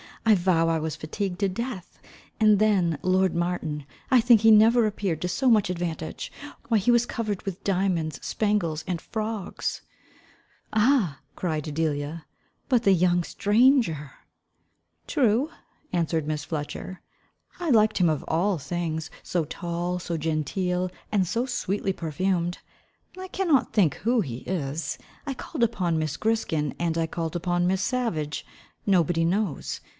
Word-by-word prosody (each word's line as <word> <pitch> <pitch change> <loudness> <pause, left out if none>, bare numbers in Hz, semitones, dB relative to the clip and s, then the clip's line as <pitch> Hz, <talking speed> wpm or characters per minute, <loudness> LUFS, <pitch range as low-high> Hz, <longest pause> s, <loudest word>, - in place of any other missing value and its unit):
I 225 - +6
vow 175 -3 +3
I 165 -1 +1
was 155 -1 -3
fatigued 180 +4 -4
to 200 -1 +2
death: 210 -2 -6 0.4
and 215 -2 +6
then, 190 -7 +2
lord 185 0 +2
Martin, 170 -4 -2 0.2
I 255 -2 +6
think 235 -2 +6
he 225 - +6
never 225 +2 +6
appeared 195 -6 -2
to 180 - -1
so 180 +9 +1
much 215 -5 +4
advantage. 170 -3 -4 0.4
Why 225 - +4
he 210 +3 +1
was 240 0 +5
quite - - -8
covered 215 -5 -2
with 195 0 -6
diamonds, 180 -5 0
spangles, 190 -8 0
and 175 -3 -2
frogs." 215 -3 -4 0.9
"Ah!" 215 - +3 0.2
cried 155 -4 -2
Delia, 150 0 -2 0.4
"but 245 -3 +3
the 195 - +5
young 175 0 +3
stranger." 210 - +2 0.9
"True," 260 0 +2 0.4
answered 165 -3 0
Miss 150 -2 -2
Fletcher, 160 +4 -5 0.6
"I 345 -2 -2
liked 215 -4 +4
him 180 -3 +4
of 155 -2 -1
all 185 +3 +1
things; 160 +1 -3
so 170 -3 -1
tall, 175 +3 -3
so 170 -1 -3
genteel, 180 +4 -1 0.2
and 195 -4 +2
so 230 +8 0
sweetly 200 -6 -1
perfumed. 175 +2 -1 0.6
I 375 - -6
cannot 355 -8 +1
think 190 -9 +3
who 235 +2 +1
he 125 - -4
is. 150 -4 -2 0.3
I 275 - -1
called 260 +1 -4
upon 180 -8 +1
Miss 155 -2 -2
Griskin, 160 - 0
and 170 -1 0
I 165 - +1
called 165 0 -4
upon 175 0 +1
Miss 190 +1 +1
Savage, 210 - -2 0.4
nobody 170 -3 +3
knows. 185 -3 -1
180 Hz, 150 wpm, -26 LUFS, 165-215 Hz, 0.9 s, I